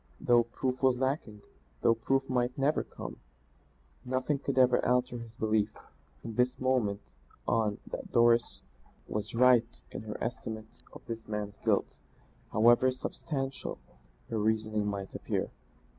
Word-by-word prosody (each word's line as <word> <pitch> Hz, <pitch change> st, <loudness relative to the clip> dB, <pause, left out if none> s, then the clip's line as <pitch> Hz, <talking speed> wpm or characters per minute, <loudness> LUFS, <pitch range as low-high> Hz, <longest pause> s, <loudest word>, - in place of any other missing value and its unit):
Though 120 Hz, -1 st, +4 dB
proof 125 Hz, +2 st, -3 dB
was 130 Hz, -2 st, +4 dB
lacking, 130 Hz, -6 st, -2 dB, 0.4 s
though 115 Hz, -, +5 dB
proof 135 Hz, +4 st, 0 dB
might 125 Hz, -1 st, 0 dB
never 140 Hz, +3 st, +2 dB
come, -, -, -8 dB, 0.9 s
nothing 130 Hz, +3 st, 0 dB
could 140 Hz, -1 st, -3 dB
ever 125 Hz, -1 st, +5 dB
alter 125 Hz, 0 st, +1 dB
his 115 Hz, 0 st, -8 dB
belief 110 Hz, -2 st, 0 dB, 0.5 s
from 115 Hz, -, -5 dB
this 125 Hz, +2 st, +1 dB
moment 125 Hz, -6 st, +1 dB, 0.5 s
on 105 Hz, -2 st, +1 dB
that -, -, -7 dB
Doris 120 Hz, 0 st, +3 dB, 0.4 s
was 105 Hz, +1 st, -4 dB
right 120 Hz, -1 st, +4 dB
in -, -, -5 dB
her 110 Hz, -1 st, -6 dB
estimate 110 Hz, -3 st, -5 dB
of -, -, -13 dB
this 115 Hz, -1 st, -6 dB
man's 105 Hz, -1 st, -4 dB
guilt, -, -, 0 dB, 0.5 s
however 120 Hz, +3 st, +5 dB
unsubstantial 135 Hz, +1 st, -3 dB, 0.5 s
her 110 Hz, -, 0 dB
reasoning 110 Hz, -1 st, +1 dB
might 100 Hz, -1 st, -4 dB
appear. -, -, -2 dB
120 Hz, 135 wpm, -31 LUFS, 110-130 Hz, 0.9 s, though